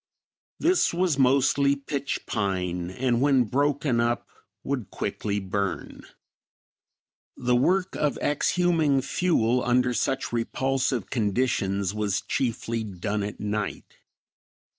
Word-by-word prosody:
This 350 - +2
was 175 -5 +1
mostly 135 +1 +4
pitch 140 0 -4
pine 90 -4 -2
and 120 +4 0
when 135 -2 +4
broken 140 +1 +1
up 120 0 0 0.4
would 130 -7 -3
quickly 105 -1 -3
burn. 100 0 -4 1.3
The 125 0 +1
work 180 +9 +2
of 150 -2 0
exhuming 155 -2 +2
fuel 125 -6 +1
under 125 0 +2
such 135 +1 -1
repulsive 130 0 -1
conditions 100 -4 0
was 105 -3 -1
chiefly 115 -2 -2
done 105 +1 -3
at 100 0 -5
night. 105 0 -4
125 Hz, 105 wpm, -26 LUFS, 105-140 Hz, 1.3 s, mostly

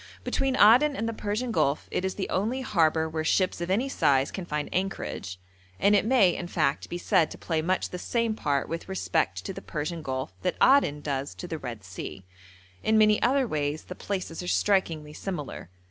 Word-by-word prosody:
Between 270 -1 0
Aden 255 +7 +6
and 225 - -2
the 230 - -2
Persian 215 +4 -2
Gulf 140 -8 +1
it - - -1
is 190 0 -2
the 195 - -3
only 225 +8 -1
harbour 160 -8 +2
where 160 0 -3
ships 185 +2 +1
of 170 - -3
any 220 +8 +1
size 140 - +2
can 190 - -5
find 150 -2 -2
anchorage, 185 - -3 0.4
and 205 +1 +4
it 205 - +2
may, 215 -9 +4
in 175 - -5
fact, 155 -5 0
be 175 - -3
said 165 -2 +2
to - - -9
play 160 -2 -1
much 185 +3 -1
the 180 - -5
same 230 +3 0
part 145 -9 -1
with 165 +3 -5
respect 190 - -1
to 195 - -4
the 195 - -8
Persian 160 0 -4
Gulf 130 -7 -4
that - - 0
Aden 260 - +4
does 140 -1 -3
to 180 - -7
the 160 -2 -4
Red 120 -6 -7
Sea. 95 0 -8 0.6
In 220 0 +2
many 215 -1 +5
other 265 +1 +3
ways 150 -3 -2
the - - -8
places 185 -3 -4
are 180 - -6
strikingly 165 -7 +1
similar. 150 - -6
180 Hz, 205 wpm, -27 LUFS, 150-210 Hz, 0.6 s, Aden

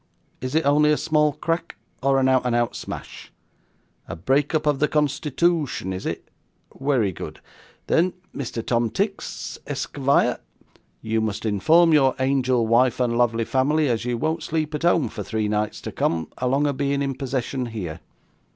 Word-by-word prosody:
Is 130 +3 -3
it 160 - +2
only 150 +2 +4
a 150 - +3
small 150 -2 +2
crack, 165 +3 -3 0.3
or 135 +1 +3
a 130 - +3
out 130 -1 +3
and 125 -1 0
out 120 0 0
smash? - - -8 0.8
A 80 - -5
break 135 - +1
up 155 0 0
of 145 -2 +2
the 150 - +3
constitootion 150 - 0
is 95 - -5
it? - - -5 0.5
werry 130 -7 +1
good. - - -8 0.5
Then 175 +2 +2 0.2
Mr. 120 -4 -4
Tom 115 -1 +1
Tix, 200 - -3
esk 145 0 -4
vire, 140 0 +2 0.6
you 110 0 0
must 110 0 -3
inform 155 - +4
your 135 -3 +4
angel 130 -3 +2
wife 120 +2 +3
and 120 -2 +1
lovely 115 -1 +2
family 145 +5 +2
as 115 -2 0
you 120 0 -1
won't 160 +4 -1
sleep 155 -1 -2
at 150 - -3
home 170 -5 +3
for 110 -1 -7
three 110 +1 -2
nights 105 0 -1
to - - -6
come, 80 -2 -1
along 135 +3 +1
of 140 -2 -1
being 140 0 0
in 135 -1 -1
possession 130 -1 -3
here. 90 -8 -5
135 Hz, 175 wpm, -23 LUFS, 115-150 Hz, 0.8 s, only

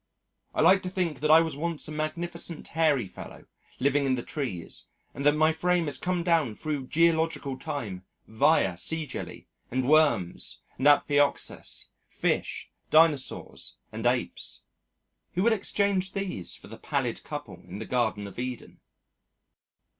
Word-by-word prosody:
I - - +2
like 190 0 +6
to 185 - -4
think 180 -6 -1
that 150 - 0
I 160 +1 +9
was 160 -3 -2
once 165 +1 -2
a - - -6
magnificent 165 +2 -4
hairy 150 -7 +2
fellow 95 - -11 0.3
living 140 +1 +2
in 130 - +2
the 120 - -4
trees 120 - -4 0.3
and 140 - -5
that 145 - +5
my 155 +1 +4
frame 175 +1 +1
has 140 -3 -2
come 180 -1 -1
down 165 -10 +2
through 145 -2 -3
geological 160 -3 +2
time 105 -9 -5 0.2
via 110 - +3
sea 160 - 0
jelly - - -7 0.2
and 130 +1 -1
worms 145 - +3 0.2
and 135 - +3
Amphioxus, 145 0 +2 0.2
Fish, - - -2 0.2
Dinosaurs, 155 -4 +2 0.2
and 110 +2 -1
Apes. 125 0 -1 0.7
Who 180 - +1
would 230 +1 +5
exchange 200 -2 0
these 190 - -3
for - - -14
the - - -11
pallid - - -2
couple - - -7
in 95 - -7
the 110 - -5
Garden 110 -4 0
of 100 +3 -9
Eden? 125 -1 -6
150 Hz, 150 wpm, -28 LUFS, 125-165 Hz, 0.7 s, I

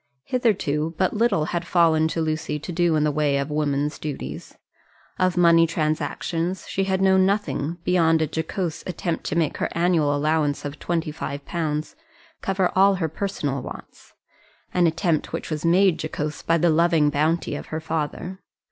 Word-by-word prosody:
Hitherto 165 - 0
but 185 - +1
little 210 -8 +2
had 175 0 -1
fallen 165 -2 +3
to 165 +1 -2
Lucy 155 -1 -2
to 150 +4 -7
do 170 -1 +2
in 150 - +2
the 150 - +2
way 145 -1 +1
of 140 +2 -2
woman's 150 0 -1
duties. 150 -3 -6 0.6
Of 185 -1 +1
money 170 -1 +6
transactions 165 +3 -2
she 195 - -1
had 190 0 0
known 190 0 +5
nothing, 170 -5 -1
beyond 165 -3 +3
a 160 - +2
jocose 160 +2 -3
attempt 175 -2 -3
to - - -2
make 165 -3 0
her - - -1
annual 170 -4 +2
allowance 150 0 0
of 145 +1 -6
twenty 165 -3 -2
five 140 -2 -6
pounds 155 - -3 0.5
cover 190 -1 0
all 195 +1 +5
her 165 -4 -1
personal 145 -7 -3
wants - - -11 0.6
an 175 -1 +4
attempt 165 -1 0
which - - -4
was 155 -1 -3
made 180 +1 +3
jocose 155 -1 -4
by 165 - +2
the 170 +1 +3
loving 160 -2 +3
bounty 155 +4 0
of - - -7
her 155 - -4
father. 160 +4 -4
165 Hz, 170 wpm, -23 LUFS, 150-180 Hz, 0.6 s, money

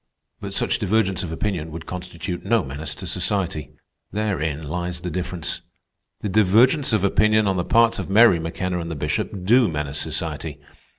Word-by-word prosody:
"But - - -6
such - - +1
divergence 95 -2 +1
of 90 - -4
opinion 80 -2 -2
would 80 +1 -7
constitute 90 -1 -5
no 115 -4 +2
menace 70 +2 -5
to - - -8
society. 90 -8 -2 0.4
Therein 85 -8 -1
lies 85 +3 -3
the 90 0 -4
difference. 90 -1 -4 0.6
The - - -2
divergence 110 - +4
of 110 -3 +2
opinion 110 +2 +3
on 95 - +1
the 90 - +1
parts 115 +3 +3
of - - -4
Mary 105 -3 +6
McKenna 90 +2 -2
and 85 -1 -5
the 80 - -4
Bishop 90 +6 -2
do 120 +3 +5
menace 75 -3 -3
society. - - -4
90 Hz, 170 wpm, -23 LUFS, 80-105 Hz, 0.6 s, Mary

